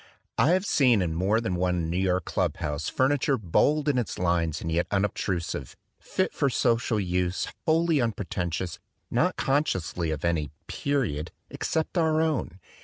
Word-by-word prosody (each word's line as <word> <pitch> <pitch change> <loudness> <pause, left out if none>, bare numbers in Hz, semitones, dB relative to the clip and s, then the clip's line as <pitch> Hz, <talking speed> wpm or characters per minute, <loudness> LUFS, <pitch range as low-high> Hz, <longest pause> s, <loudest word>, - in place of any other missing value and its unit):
I 145 - +5
have 185 +2 +1
seen 125 - +4
in 85 -2 -1
more 95 +7 +2
than 115 -5 -2
one 90 -2 0
New 90 - 0
York 95 -2 +1
club - - -1
house 75 0 -2
furniture 135 +1 +2
bold 140 - +2
in 140 -4 +3
its 120 - -3
lines 85 -3 +1
and 80 - -4
yet 85 +2 +1
un 100 0 +2
obtrusive, 85 -10 -3 0.2
fit 185 - -1
for 140 - +1
its 130 - -1
social 115 -2 +2
use, 90 -1 -1 0.2
wholly 165 0 +3
unpre 115 -6 -1
tentious, 85 0 -3 0.3
not - - +2
consciously 95 - 0
of 80 0 -2
any 80 -4 0 0.2
"period" 115 - -1 0.2
except 160 +2 -1
our 160 -1 +3
own. 150 - 0
95 Hz, 170 wpm, -27 LUFS, 85-140 Hz, 0.3 s, I